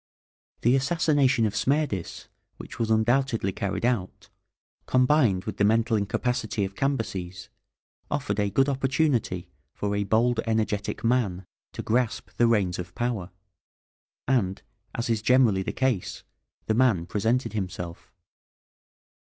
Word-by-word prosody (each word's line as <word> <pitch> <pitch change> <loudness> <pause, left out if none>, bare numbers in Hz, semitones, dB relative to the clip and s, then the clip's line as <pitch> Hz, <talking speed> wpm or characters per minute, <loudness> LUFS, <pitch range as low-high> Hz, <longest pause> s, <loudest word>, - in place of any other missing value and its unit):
The 120 +3 +4
assassination 135 -4 +2
of 105 - -1
Smerdis, 140 - -1 0.3
which - - -10
was 115 -1 0
undoubtedly 115 -1 +2
carried 100 +4 -3
out, 120 -7 -2 0.6
combined 125 -7 +3
with - - -5
the - - +2
mental 115 +2 +3
incapacity 110 +1 -1
of 95 - -7
Cambyses, 100 -10 -3 0.6
offered 130 -8 -2
a 100 -1 +1
good 135 +8 +2
opportunity 135 - 0 0.3
for 100 0 -2
a 100 - 0
bold, 115 +4 +2
energetic 110 -2 -1
man 110 -7 +1 0.3
to - - -5
grasp 120 0 -1
the 120 - +4
reins 100 -6 +1
of 90 0 -7
power, 115 -7 -2 1.0
and, 105 -8 0 0.3
as 115 - -2
is 115 -2 0
generally 115 -5 +4
the - - -3
case, 130 -8 -1 0.4
the 110 - +1
man 110 -8 +3
presented 110 +8 0
himself. 90 -4 -5
115 Hz, 125 wpm, -26 LUFS, 100-125 Hz, 1.0 s, The